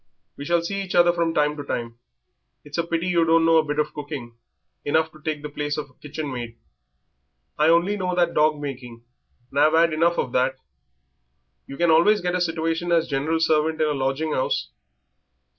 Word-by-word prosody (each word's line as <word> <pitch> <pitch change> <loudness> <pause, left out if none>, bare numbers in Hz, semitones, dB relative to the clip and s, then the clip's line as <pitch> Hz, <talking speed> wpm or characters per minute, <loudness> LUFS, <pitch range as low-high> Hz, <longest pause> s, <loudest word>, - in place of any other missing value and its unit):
We 140 - -8
shall 170 +1 +1
see 200 +3 -3
each 190 -2 -5
other 175 0 +5
from 170 -1 0
time 150 -1 +1
to 145 - -5
time. 115 -4 -5 0.7
It's 145 +3 -5
a - - +2
pity 170 0 -1
you 175 -2 +2
don't 165 0 +3
know 165 0 +5
a 160 - +4
bit 150 -1 -4
of 150 0 -1
cooking, 145 -5 -7 0.5
enough 160 +2 +1
to 155 - -17
take 155 -1 -4
the 150 - -5
place 145 0 -3
of 140 -4 -8
kitchen 150 -1 -5
maid." 120 -2 -6 1.0
"I 155 +1 +4
only 175 +5 +3
know 180 -2 -2
that 175 -1 +2
dog 150 0 +2
making, 125 -5 -7 0.5
and 140 - -1
I've 155 +2 +4
'ad 165 0 +4
enough 170 +2 +2
of 125 - -1
that." 130 +1 +1 1.1
"You 140 - -8
can 170 -1 +3
always 205 +7 +5
get 180 0 -2
a 180 - 0
situation 165 0 -1
as 165 -1 +2
general 150 +4 -1
servant 160 0 +1
in 155 -1 +2
a - - 0
lodging 135 +3 -1
'ouse." 100 - -1
155 Hz, 200 wpm, -23 LUFS, 145-170 Hz, 1.1 s, other